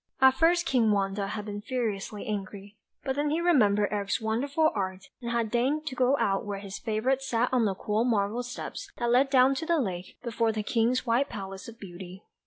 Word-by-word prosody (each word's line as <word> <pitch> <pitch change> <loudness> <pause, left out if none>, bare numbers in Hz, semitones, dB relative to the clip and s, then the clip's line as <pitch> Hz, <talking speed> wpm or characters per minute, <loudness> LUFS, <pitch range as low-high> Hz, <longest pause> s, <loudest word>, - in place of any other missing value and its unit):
At 265 -1 +7
first 335 +5 +3
King 240 -7 +3
Wanda 200 -1 0
had 210 +1 -5
been 205 -1 -5
furiously 215 -4 -3
angry, 200 0 -5 0.3
but 265 -1 -1
then 290 +1 0
he 310 +3 0
remembered 210 -12 +3
Eric's 200 -2 -1
wonderful 275 +8 +1
art, 190 -1 -4
and 235 - -4
had 235 -2 -1
deigned 270 +6 +1
to 310 - -4
go 255 +2 +3
out 195 -5 +1
to - - -9
where 200 -1 -3
his 195 0 -7
favourite 240 +4 0
sat 250 -2 0
on 245 -3 +3
the 195 -2 0
cool 210 +3 0
marble 220 -1 +1
steps, 245 0 -7
that 240 -1 0
led 260 +3 +4
down 265 0 +5
to 295 +4 -3
the 340 -1 +3
lake, 185 - -3
before 230 -1 0
the 215 -1 -3
King's 235 +4 +1
white 245 +4 +2
palace 195 -3 -7
of 230 0 -11
beauty. 185 0 -10
230 Hz, 210 wpm, -28 LUFS, 205-260 Hz, 0.3 s, At